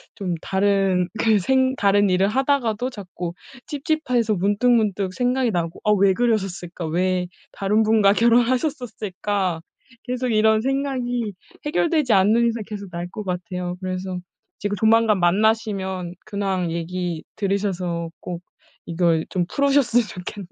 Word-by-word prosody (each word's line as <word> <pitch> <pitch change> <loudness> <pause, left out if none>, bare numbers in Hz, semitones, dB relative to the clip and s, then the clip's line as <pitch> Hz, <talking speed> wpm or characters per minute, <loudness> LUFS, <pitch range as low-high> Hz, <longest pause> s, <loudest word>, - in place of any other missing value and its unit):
좀 190 -5 -3
다른 195 -2 +1
그 220 -2 +4
생 260 +5 +2
다른 205 -2 +3
일을 185 +2 +3
하다가도 255 -1 0
자꾸 180 -6 -6 0.3
찝찝해서 280 -7 0
문득문득 205 -1 +1
생각이 250 0 +1
나고 170 -2 -2
'아. 210 - +3
왜 195 -1 +4
그러셨을까? 190 -7 -1
왜 180 +2 0 0.2
다른 210 +3 +1
분과 215 -2 +4
결혼하셨었을까?' 230 - 0 0.4
계속 250 0 -2
이런 220 0 +3
생각이 250 -5 -1 0.3
해결되지 295 - +1
않는 215 +5 +4
이상 230 -2 -2
계속 200 -3 -7
날 175 +1 -4
것 215 -2 -6
같아요. 180 -1 -4
그래서 185 0 -4 0.4
지금 205 0 -2
조만간 220 -2 +4
만나시면 190 -2 +1
근황 195 -4 -2
얘기 170 0 -3
들으셔서 185 -4 -2
꼭 175 -1 -6 0.5
이걸 165 -1 +1
좀 180 -2 0
풀으셨으면 275 -4 +2
좋겠네요. 185 +1 -8
205 Hz, 300 characters per minute, -22 LUFS, 180-235 Hz, 0.5 s, 그